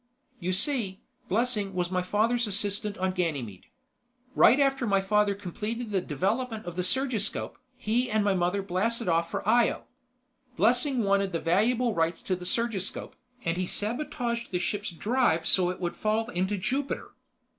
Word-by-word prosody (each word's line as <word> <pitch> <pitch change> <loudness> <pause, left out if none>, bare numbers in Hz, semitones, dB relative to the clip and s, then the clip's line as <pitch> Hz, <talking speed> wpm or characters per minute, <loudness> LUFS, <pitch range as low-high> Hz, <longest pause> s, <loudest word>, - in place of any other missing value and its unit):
"You 180 -1 -2
see, 200 -1 0 0.3
Blessing 210 -2 0
was 180 0 -1
my 185 -1 +1
father's 220 +5 +1
assistant 205 0 -1
on 185 0 0
Ganymede. 145 - -3 0.7
Right 265 - +6
after 270 -3 +2
my 195 -1 +3
father 205 +1 +2
completed 210 +4 -5 0.2
development 220 - -1
of 175 -1 -6
the 180 - -1
surgiscope, 240 +1 0 0.2
he 245 +4 0
and 215 -1 +2
my 200 -1 +2
mother 180 +2 0
blasted 205 +4 -1
off 170 0 +2
for - - -4
Io. 235 +2 +3 0.7
Blessing 250 +1 +3
wanted 200 -1 +1
the 165 - 0
valuable 225 +8 +2
rights 165 -1 0
to 185 - 0
the 180 0 -6
surgiscope, 215 -2 -1 0.3
and 165 +1 0
he 185 0 -1
sabotaged 235 +1 -2
the 180 - -1
ship's 205 +3 -2
drive 205 -1 +1
so 180 -2 +4
it 180 - -4
would 175 -1 -3
fall 220 +2 0
into 190 +3 0
Jupiter. 265 +8 -2
205 Hz, 155 wpm, -28 LUFS, 180-235 Hz, 0.7 s, Right